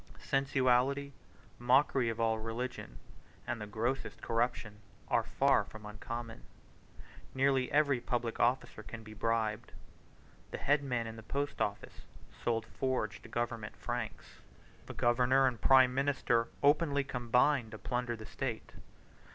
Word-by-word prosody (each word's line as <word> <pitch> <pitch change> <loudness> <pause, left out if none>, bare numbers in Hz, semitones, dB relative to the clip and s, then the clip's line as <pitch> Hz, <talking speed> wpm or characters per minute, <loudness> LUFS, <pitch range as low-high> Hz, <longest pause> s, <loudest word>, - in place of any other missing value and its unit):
Sensuality, 135 0 +2 0.5
mockery 130 0 +3
of 115 0 -4
all 110 -1 +1
religion, 115 - -5 0.5
and 120 -2 -3
the 105 - -5
grossest 115 +5 -2
corruption, 115 -2 -1 0.3
are - - +3
far - - +2
from 110 -1 -12
uncommon. 115 - -6 0.9
Nearly 135 -1 +2
every 140 -4 +3
public 120 -2 -2
officer 120 -2 +1
can 115 +1 -9
be 110 0 -10
bribed. 115 0 -1 0.8
The - - -5
head 145 +1 +2
man 125 -4 -1
in 115 0 -7
the - - -8
post 140 +6 -3
office 100 - -3 0.4
sold 115 -1 0
forged 125 -3 -3
government 120 -2 -3
franks. 120 -2 -5 0.5
The - - -8
governor 125 +3 +3
and 125 -3 0
prime 130 -1 +6
minister 135 -4 +1 0.2
openly 145 -1 +3
combined 125 0 +2
to 110 - -8
plunder 120 +1 -2
the 110 -1 -10
state. 120 0 -4
120 Hz, 130 wpm, -33 LUFS, 115-135 Hz, 0.9 s, prime